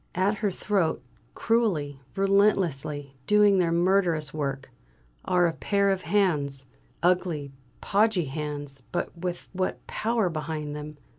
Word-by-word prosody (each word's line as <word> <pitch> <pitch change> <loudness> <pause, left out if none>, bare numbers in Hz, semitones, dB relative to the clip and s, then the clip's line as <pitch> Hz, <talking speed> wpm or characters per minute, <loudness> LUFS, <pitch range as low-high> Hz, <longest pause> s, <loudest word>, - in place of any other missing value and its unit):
At 195 +4 +1
her 210 - +1
throat, 185 -6 0 0.3
cruelly, 165 - 0
relentlessly 170 -8 +1
doing 210 -2 +5
their 170 -2 +2
murderous 170 -3 +2
work, 140 -3 -3 0.5
are 180 -1 +3
a 165 - +1
pair 200 +3 +1
of 190 -1 -1
hands 150 -8 +1 0.4
ugly, 170 -6 +1 0.3
podgy 205 -3 +2
hands, 145 -1 -5
but - - -2
with 175 0 -5
what 185 0 -2
power 225 -3 0
behind 155 -2 -4
them! 150 0 -7
175 Hz, 125 wpm, -27 LUFS, 150-195 Hz, 0.5 s, doing